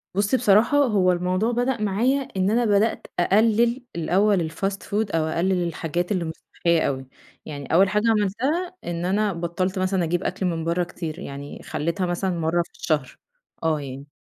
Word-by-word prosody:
بُصي 205 Hz, +6 st, +2 dB
بصراحة، 225 Hz, +5 st, +4 dB
هو 205 Hz, -10 st, +3 dB
الموضوع 185 Hz, +6 st, 0 dB
بدأ 245 Hz, -1 st, 0 dB
معايا 235 Hz, +8 st, +1 dB, 0.2 s
إن 190 Hz, +1 st, +2 dB
أنا 240 Hz, +1 st, +2 dB
بدأت 210 Hz, +2 st, +1 dB
أقلّل 230 Hz, +6 st, +3 dB
الأول 175 Hz, +1 st, +2 dB
الfast 195 Hz, +4 st, -2 dB
food 205 Hz, -3 st, -1 dB
أو 160 Hz, -1 st, +2 dB
أقلل 175 Hz, +2 st, 0 dB
الحاجات 170 Hz, +3 st, -3 dB
اللي 180 Hz, -4 st, 0 dB
مش 160 Hz, -, -4 dB, 0.2 s
صحية 170 Hz, -2 st, +2 dB
أوي، 130 Hz, -1 st, -3 dB, 0.4 s
يعني 145 Hz, 0 st, -6 dB
أول 190 Hz, +3 st, +5 dB
حاجة 210 Hz, +2 st, +1 dB
عملتها، 260 Hz, -, 0 dB
إن 175 Hz, 0 st, -3 dB
أنا 205 Hz, +1 st, +1 dB
بطّلت 180 Hz, +3 st, -2 dB
مثلًا 185 Hz, -1 st, +1 dB
أجيب 175 Hz, +3 st, -1 dB
أكل 190 Hz, -, -2 dB
من 165 Hz, -2 st, -1 dB
بره 170 Hz, +2 st, 0 dB
كتير، 170 Hz, -1 st, -6 dB
يعني 140 Hz, -4 st, -8 dB
خلّيتها 170 Hz, +5 st, -2 dB
مثلًا 175 Hz, 0 st, -1 dB
مرة 165 Hz, +2 st, +1 dB
في -, -, -23 dB
الشهر، -, -, -2 dB, 0.5 s
آه 155 Hz, -2 st, +1 dB
يعني. 140 Hz, +1 st, -8 dB
185 Hz, 175 wpm, -24 LUFS, 170-210 Hz, 0.5 s, أول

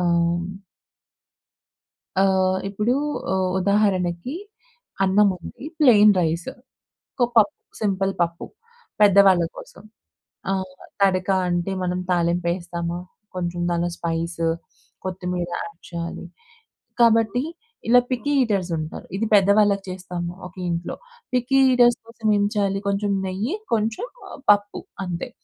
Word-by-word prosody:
ఆహ్ 170 Hz, -1 st, +2 dB, 1.8 s
ఆహ్, 190 Hz, -1 st, +3 dB
ఇప్పుడు 210 Hz, +5 st, 0 dB, 0.4 s
ఉ -, -, +1 dB, 0.3 s
ఉదాహరణకి 195 Hz, -, +1 dB, 0.7 s
అన్నం 200 Hz, +2 st, +4 dB
ఉంది. 175 Hz, -, -10 dB, 0.2 s
ప్లెయిన్ 215 Hz, -7 st, +7 dB
రైస్ 165 Hz, 0 st, -1 dB, 0.7 s
ఒక -, -, +6 dB
పప్ 225 Hz, +7 st, +6 dB, 0.3 s
సింపుల్ 195 Hz, -2 st, +1 dB
పప్పు 170 Hz, 0 st, -1 dB, 0.6 s
పెద్దవాళ్ళ 195 Hz, -3 st, +6 dB
కోసం. -, -, -12 dB, 0.7 s
ఆహ్, 190 Hz, -1 st, -3 dB, 0.3 s
తడక 185 Hz, -2 st, +2 dB, 0.2 s
అంటే 175 Hz, +2 st, -1 dB
మనం 180 Hz, 0 st, -1 dB
తాలింప్పెస్తామ, 170 Hz, 0 st, -1 dB, 0.5 s
కొంచెం 175 Hz, -1 st, -3 dB
దానిలో 175 Hz, 0 st, 0 dB
స్పైస్, 170 Hz, 0 st, -3 dB, 0.6 s
కొత్తిమీర 180 Hz, -1 st, -3 dB
యాడ్ 210 Hz, -5 st, -8 dB
చేయాలి. 170 Hz, 0 st, -5 dB, 0.7 s
కాబట్టి 230 Hz, 0 st, +4 dB, 0.5 s
ఇలా 245 Hz, +1 st, +7 dB
పిక్కీ 260 Hz, +3 st, -1 dB
ఈటర్స్ 200 Hz, -7 st, 0 dB
ఉంటారు. 155 Hz, 0 st, -6 dB
ఇది 225 Hz, +3 st, -1 dB
పెద్దవాళ్ళకి 200 Hz, 0 st, +4 dB
చేస్తాము 180 Hz, -2 st, -5 dB, 0.2 s
ఒకే 185 Hz, +1 st, -11 dB
ఇంట్లో. 170 Hz, +1 st, -3 dB, 0.4 s
పిక్కీ 250 Hz, +2 st, +1 dB, 0.2 s
ఈటర్స్ 240 Hz, -1 st, +5 dB
కోసం 230 Hz, -1 st, -4 dB
ఏం 205 Hz, -, +2 dB
చేయాలి? 200 Hz, -2 st, +1 dB
కొంచెం 200 Hz, +1 st, 0 dB, 0.2 s
నెయ్యి, 200 Hz, -, -2 dB, 0.2 s
కొంచెం 220 Hz, -, -1 dB, 0.4 s
పప్పు 205 Hz, 0 st, +2 dB, 0.2 s
అంతే. 180 Hz, +6 st, -4 dB
190 Hz, 110 wpm, -23 LUFS, 175-210 Hz, 1.8 s, ప్లెయిన్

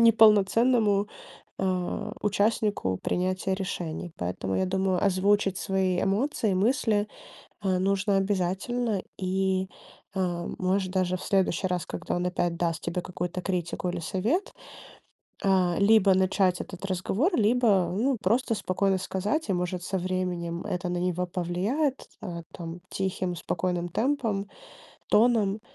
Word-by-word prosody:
неполноценному, 220 Hz, -1 st, +5 dB, 0.5 s
э, 185 Hz, -2 st, -1 dB
участнику 205 Hz, -, +1 dB
принятия 185 Hz, +1 st, 0 dB
решений. 175 Hz, -3 st, -4 dB
Поэтому, 90 Hz, +2 st, -2 dB
я -, -, +2 dB
думаю, 190 Hz, 0 st, +1 dB
озвучить 195 Hz, 0 st, +2 dB
свои 190 Hz, -2 st, 0 dB
эмоции, 210 Hz, +1 st, +1 dB
мысли, 215 Hz, 0 st, +2 dB, 0.6 s
э, 185 Hz, -1 st, +2 dB
нужно 195 Hz, +1 st, +1 dB
обязательно, 195 Hz, +3 st, 0 dB, 0.2 s
и, 190 Hz, 0 st, 0 dB, 0.5 s
а, 175 Hz, -2 st, -1 dB
может, 185 Hz, 0 st, 0 dB
даже 185 Hz, -1 st, +1 dB
в -, -, -9 dB
следующий 190 Hz, -1 st, +1 dB
раз, 180 Hz, -1 st, -2 dB
когда 180 Hz, -, -3 dB
он 175 Hz, 0 st, -1 dB
опять 175 Hz, -1 st, -1 dB
даст 165 Hz, -1 st, -1 dB
тебе 170 Hz, +1 st, -2 dB
какую-то 180 Hz, 0 st, -4 dB
критику 180 Hz, 0 st, -2 dB
или 175 Hz, 0 st, -2 dB
совет, 220 Hz, -, -1 dB, 0.9 s
а, 185 Hz, -3 st, +3 dB
либо 200 Hz, -1 st, +5 dB
начать 185 Hz, -1 st, +2 dB
этот 190 Hz, +1 st, -8 dB
разговор, 195 Hz, -, 0 dB
либо, 215 Hz, -5 st, +3 dB
ну, 255 Hz, +4 st, +1 dB
просто 230 Hz, +4 st, +1 dB
спокойно 195 Hz, -1 st, +1 dB
сказать, 200 Hz, -, -2 dB
и, -, -, +3 dB
может, 180 Hz, 0 st, -2 dB
со 190 Hz, +1 st, -2 dB
временем 175 Hz, -2 st, -2 dB
это 180 Hz, 0 st, -2 dB
на 175 Hz, -, -1 dB
него 180 Hz, 0 st, -1 dB
повлияет, 190 Hz, -, -1 dB
а, 175 Hz, -4 st, -5 dB
там, 170 Hz, 0 st, -7 dB
тихим 185 Hz, -2 st, -2 dB
спокойным 175 Hz, 0 st, -2 dB
темпом, 220 Hz, -, -1 dB, 0.6 s
тоном, 215 Hz, -2 st, +3 dB
190 Hz, 130 wpm, -27 LUFS, 180-205 Hz, 0.9 s, неполноценному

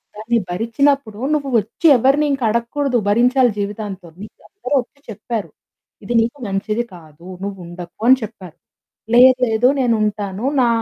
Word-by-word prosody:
దాన్ని 225 Hz, +2 st, 0 dB
భరించినప్పుడు 230 Hz, +3 st, 0 dB, 0.2 s
నువ్వు 280 Hz, -2 st, -2 dB
వచ్చి 225 Hz, -, -1 dB
ఎవరిని 275 Hz, +5 st, +2 dB, 0.2 s
అడగకూడదు. 245 Hz, +4 st, -1 dB
భరించాలి 245 Hz, +3 st, +3 dB
జీవితాంతం. 200 Hz, -4 st, -5 dB
నీకు 215 Hz, -, -13 dB
అందరూ 395 Hz, -9 st, -6 dB
వచ్చి 280 Hz, +3 st, -20 dB
చెప్పారు, 220 Hz, 0 st, -5 dB, 0.5 s
"ఇది 240 Hz, -, -3 dB
నీకు 235 Hz, +5 st, -2 dB
మంచిది 210 Hz, +4 st, -2 dB
కాదు. 160 Hz, 0 st, -16 dB, 0.2 s
నువ్వు 200 Hz, 0 st, -5 dB
ఉండకు" 175 Hz, +1 st, -10 dB
అని 260 Hz, -, +7 dB
చెప్పారు. 190 Hz, -6 st, -10 dB, 0.6 s
"లేదు, 255 Hz, +1 st, +7 dB
లేదు. 225 Hz, +3 st, +3 dB
నేను 235 Hz, -2 st, +2 dB
ఉంటాను. 205 Hz, +1 st, -3 dB, 0.2 s
నా 240 Hz, -, +3 dB
225 Hz, 140 wpm, -19 LUFS, 200-255 Hz, 0.6 s, అని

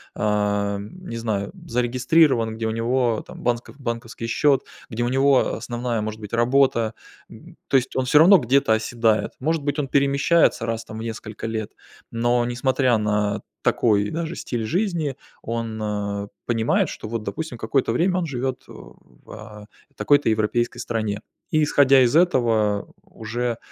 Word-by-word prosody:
а, 105 Hz, -1 st, 0 dB
м, 110 Hz, -, -9 dB
не -, -, -5 dB
знаю 105 Hz, -3 st, -2 dB, 0.2 s
зарегистрирован, 125 Hz, 0 st, +2 dB
где 110 Hz, 0 st, -3 dB
у -, -, -1 dB
него 115 Hz, 0 st, 0 dB
там -, -, -11 dB
банск 120 Hz, 0 st, -1 dB
банковский 115 Hz, -2 st, -5 dB
счет, 135 Hz, +4 st, +2 dB, 0.3 s
где 120 Hz, +2 st, -2 dB
у 120 Hz, -, 0 dB
него 135 Hz, 0 st, +3 dB
основная 120 Hz, 0 st, -3 dB
может 110 Hz, +1 st, -5 dB
быть 105 Hz, +1 st, -9 dB
работа, 120 Hz, -2 st, +2 dB, 0.4 s
эм, -, -, -14 dB
то 135 Hz, -, +5 dB
есть 130 Hz, 0 st, -2 dB
он 130 Hz, -, 0 dB
все 150 Hz, +4 st, +5 dB
равно 185 Hz, +4 st, +8 dB
где-то 125 Hz, -2 st, +2 dB
оседает. 110 Hz, 0 st, +1 dB
Может 160 Hz, +3 st, 0 dB
быть 145 Hz, +1 st, -1 dB
он 140 Hz, -, -1 dB
перемещается 140 Hz, 0 st, +2 dB
раз 115 Hz, 0 st, -3 dB
там 110 Hz, -, -9 dB
в -, -, -6 dB
несколько 115 Hz, -1 st, -6 dB
лет, 110 Hz, -2 st, -4 dB, 0.4 s
но 120 Hz, +1 st, +1 dB
несмотря 125 Hz, 0 st, +1 dB
на 105 Hz, 0 st, 0 dB, 0.2 s
такой 105 Hz, -3 st, +2 dB
даже 165 Hz, +1 st, -4 dB
стиль 120 Hz, -3 st, -4 dB
жизни, 170 Hz, -, -1 dB, 0.3 s
он, 115 Hz, -1 st, -4 dB
а, 100 Hz, -1 st, -3 dB, 0.2 s
понимает, 115 Hz, -1 st, +1 dB
что -, -, -7 dB
вот 115 Hz, 0 st, -3 dB
допустим 120 Hz, +5 st, -5 dB
какое-то 120 Hz, +1 st, 0 dB
время 180 Hz, +9 st, +1 dB
он 180 Hz, -, -1 dB
живет 130 Hz, -3 st, -3 dB
в, -, -, -16 dB
а, 105 Hz, -1 st, -11 dB, 0.3 s
такой-то 145 Hz, -4 st, +3 dB
европейской 110 Hz, +2 st, 0 dB
стране. 110 Hz, -3 st, -3 dB, 0.3 s
И 155 Hz, -, +3 dB
исходя 140 Hz, -2 st, +5 dB
из 125 Hz, +2 st, +3 dB
этого 115 Hz, -, +2 dB
уже, 115 Hz, +1 st, -4 dB
120 Hz, 160 wpm, -23 LUFS, 110-135 Hz, 0.4 s, равно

